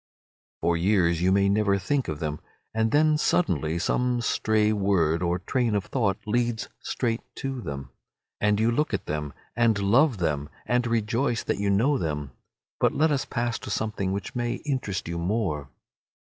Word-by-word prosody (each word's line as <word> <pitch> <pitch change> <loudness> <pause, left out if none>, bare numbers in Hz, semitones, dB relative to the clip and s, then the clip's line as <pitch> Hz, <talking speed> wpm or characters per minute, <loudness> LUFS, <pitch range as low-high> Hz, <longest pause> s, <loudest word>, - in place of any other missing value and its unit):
For 85 +1 +2
years 85 -2 +2
you 90 +1 +3
may 100 0 +4
never 100 0 +2
think 130 +8 -1
of 75 - -3
them, 75 -1 -3 0.3
and 110 0 +1
then 150 +3 +3
suddenly 85 - +1
some 125 +7 +1
stray 110 -2 +2
word 90 -5 +2
or 85 0 +1
train 115 +4 0
of 100 - 0
thought 100 -7 0
leads 120 +1 0
straight 115 -2 -2
to 135 -2 -4
them, 70 - -6 0.5
and 105 0 +2
you 115 +2 +3
look 135 -2 +1
at - - -5
them 75 -1 -3 0.2
and 115 -2 +3
love 115 +6 +3
them, 75 -4 -1 0.2
and 125 0 +1
rejoice 115 +2 0
that - - -1
you 100 0 0
know 125 +8 +3
them. 75 -4 -3 0.5
But - - +2
let 155 +1 +3
us 140 -2 0
pass 120 -1 -2
to - - -8
something 100 -2 -1
which 100 0 -4
may 120 -1 -1
interest 130 - -2
you 85 0 -3
more. 85 -7 -1
105 Hz, 175 wpm, -26 LUFS, 85-120 Hz, 0.5 s, may